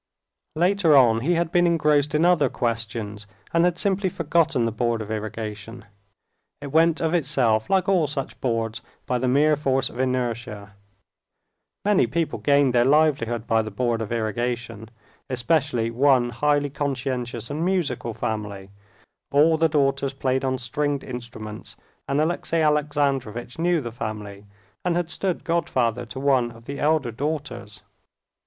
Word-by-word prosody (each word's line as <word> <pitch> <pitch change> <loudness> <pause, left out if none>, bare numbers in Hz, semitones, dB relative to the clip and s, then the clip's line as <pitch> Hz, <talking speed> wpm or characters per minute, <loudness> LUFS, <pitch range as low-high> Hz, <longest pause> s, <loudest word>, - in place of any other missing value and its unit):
Later 175 -1 +3
on 115 -4 +5
he 165 +9 +1
had 170 -1 0
been 175 0 +4
engrossed 150 -3 +2
in 155 +3 +3
other 165 -7 +4
questions, 110 -3 -3 0.3
and 170 0 +4
had 175 -1 +1
simply 195 0 0
forgotten 160 -6 +1
the 115 - 0
Board 115 +1 -1
of 110 0 -6
Irrigation. 110 +1 -6 0.7
It 140 -1 -7
went 165 +1 +3
of 165 0 0
itself, 130 -9 +1
like 190 -1 +2
all 180 -6 +3
such 140 -2 -5
boards, 115 -2 -1 0.2
by 125 - -1
the 130 - 0
mere 150 +4 +4
force 135 -3 0
of 120 - -10
inertia. 120 -5 -2 1.1
(Many 205 - +3
people 165 +6 -2
gained 140 -3 +3
their 120 -1 +4
livelihood 135 -5 +2
by 115 -1 +2
the 110 - -5
Board 115 +2 -1
of 110 - -5
Irrigation, 115 0 -3 0.4
especially 125 -3 0
one 125 -1 +3
highly 145 +3 +1
conscientious 130 -4 -3
and 155 +3 -2
musical 155 - -1
family: 105 -3 -4 0.6
all 155 +3 +5
the 160 0 +2
daughters 140 -2 +1
played 130 -1 -1
on 130 -1 0
stringed 140 +4 -2
instruments, 120 -4 -8 0.3
and 140 +1 0
Alexey 165 +1 0
Alexandrovitch 140 -5 0
knew 170 -1 +2
the 120 -3 -6
family 105 -3 -6 0.4
and 180 -1 0
had 175 -1 -1
stood 185 -3 -2
godfather 125 -8 0
to 125 +4 -7
one 135 -3 +2
of 115 0 -15
the 140 +2 -6
elder 150 -5 +1
daughters.) 125 -5 -5
130 Hz, 150 wpm, -24 LUFS, 115-155 Hz, 1.1 s, on